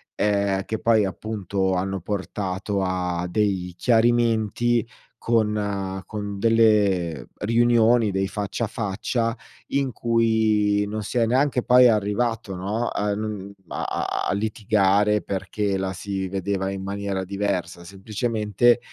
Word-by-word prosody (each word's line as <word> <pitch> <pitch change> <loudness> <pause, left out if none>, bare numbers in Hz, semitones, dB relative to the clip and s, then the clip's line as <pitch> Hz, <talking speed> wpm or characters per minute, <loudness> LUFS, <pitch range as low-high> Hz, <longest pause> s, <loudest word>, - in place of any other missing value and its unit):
ehm, 100 -2 +1
che 110 +2 -4
poi 110 -2 +3
appunto 95 -1 -2
hanno 95 +1 -1
portato 95 +1 -3
a 90 -2 -1
dei 95 -3 -1
chiarimenti 120 0 +2 0.3
con 105 -4 0
con 100 -2 -5
delle 100 - +2
riunioni, 115 0 +3
dei 95 0 -1
faccia 100 +2 -3
a - - 0
faccia 115 +2 -2 0.3
in 140 -2 0
cui 110 -3 +2
non 105 0 -4
si 125 - -4
è 115 - +4
neanche 130 +2 +2
poi 125 0 +6
arrivato, 110 0 0
no, 105 +6 -2
a 105 0 -1
non 105 -2 -5
a - - -4
a - - -2
a - - +1
litigare 105 0 +2
perché 100 +1 -2
la 95 0 -2
si 95 0 -4
vedeva 95 0 -2
in 95 -1 -5
maniera 100 -1 -3
diversa; 95 -3 -3
semplicemente, 105 +4 +1
105 Hz, 125 wpm, -24 LUFS, 95-115 Hz, 0.3 s, poi